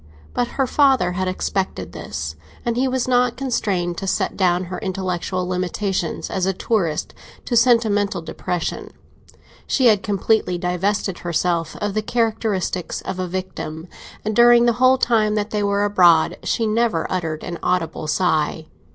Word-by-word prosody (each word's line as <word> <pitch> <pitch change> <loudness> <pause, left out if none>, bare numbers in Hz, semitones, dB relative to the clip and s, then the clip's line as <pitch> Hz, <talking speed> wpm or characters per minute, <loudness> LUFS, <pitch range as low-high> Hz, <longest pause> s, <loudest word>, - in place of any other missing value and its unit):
But 245 - 0
her 270 - +3
father 265 -9 +3
had 185 +1 -2
expected 190 +1 -2
this, 75 +1 -5 0.3
and 235 -1 0
he 260 +2 +1
was 255 -1 -1
not 245 -1 +2
constrained 195 -10 -1
to 195 - -5
set - - 0
down 180 -1 +2
her 180 0 -6
intellectual 185 -2 -2
limitations 185 0 -2
as 190 -1 0
a 190 - +1
tourist 180 -6 -1 0.3
to 240 - -1
sentimental 215 -6 +3
depression; 175 +1 -4 0.8
she 260 - +2
had 210 -3 +3
completely 205 -2 +1
divested 185 +2 -1
herself 170 0 -1
of 205 -1 -3
the 215 - 0
characteristics 215 -5 -1
of 185 - -5
a 185 - -2
victim, 180 -3 -5 0.4
and 215 0 -1
during 240 0 +6
the 240 - +4
whole 260 0 +6
time 220 -4 +2
that 210 0 -2
they 210 - 0
were 200 0 +1
abroad 175 -5 +4
she 230 - 0
never 220 -6 +1
uttered 165 -4 -2
an 175 -1 -5
audible 165 -4 -1
sigh. 155 -2 0
195 Hz, 155 wpm, -21 LUFS, 180-225 Hz, 0.8 s, during